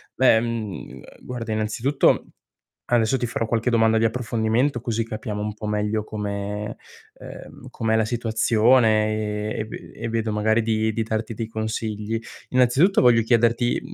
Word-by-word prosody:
Beh, 125 -4 +5
mhmm, 115 -4 -4
uhm, 65 - -11 0.2
guarda, 120 -3 -6
innanzitutto, 110 +6 +1 0.6
adesso 120 +1 +2
ti 120 - -1
farò 115 0 -2
qualche 115 +1 0
domanda 115 -1 +3
di 115 - +1
approfondimento, 115 +2 0
così 115 -1 -1
capiamo 110 -1 -5
un 105 - -3
po' 105 0 -7
meglio 105 0 -1
come 105 0 -4 0.4
ehm, - - -11
com'è 110 0 0
la 110 - +2
situazione, 110 -2 +2
ehm, - - -6
e - - -1
ve - - -10
e - - -5
vedo 115 -1 -1
magari 110 +2 +2
di 110 0 0
di 115 - -1
darti 110 0 -3
dei 110 +1 -4
consigli. 110 0 -3 0.3
Innanzitutto, 130 +10 +4
voglio 120 -2 +5
chiederti 115 +1 +2
110 Hz, 155 wpm, -23 LUFS, 110-115 Hz, 0.6 s, Beh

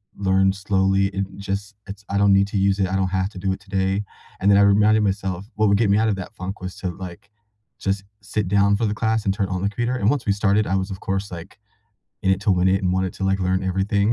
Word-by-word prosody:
learn 95 -1 +2
slowly 95 0 +1
it 100 0 -3
just 100 +1 -4
it's 100 +1 -9
I 100 - -1
don't 100 -1 +4
need 100 0 +4
to 100 - -3
use 100 +1 +2
it, 95 - +2
I 95 - -2
don't 95 -1 +1
have 95 0 -1
to 95 - -12
do 95 +1 -1
it 95 - -3
today." 95 0 -1 0.4
And 100 - +2
then 100 - +6
I 100 - +6
reminded 105 +2 +4
myself 95 0 -2
what 110 0 +2
would 100 0 +4
get 110 -1 +2
me 100 - +4
out 110 - +2
of 100 - +1
that 95 -2 -7
funk 95 +1 -6
was 95 0 -6
to 95 - -3
like, 90 +2 -10 0.5
just 95 0 -1 0.2
sit 100 -1 -2
down 100 +1 +3
for 115 - 0
the 105 - 0
class 110 0 0
and 95 - +2
turn 100 -1 -1
on 95 -1 -2
the 100 - +1
computer, 120 +4 -2
and 105 0 +2
once 140 -2 0
we 105 - +2
started, 100 +1 +2
I 95 - 0
was, 95 +1 -1
of 95 - -6
course, 95 +1 -2
like, 85 +2 -9 0.6
in 95 - +2
it 95 0 +1
to 105 - +2
win 90 0 +3
it 95 +1 +2
and 90 -1 +1
wanted 95 0 0
to, 95 - -4
like, 95 0 +1
learn 95 +1 0
everything, 100 +3 +1
100 Hz, 275 wpm, -22 LUFS, 95-100 Hz, 0.6 s, then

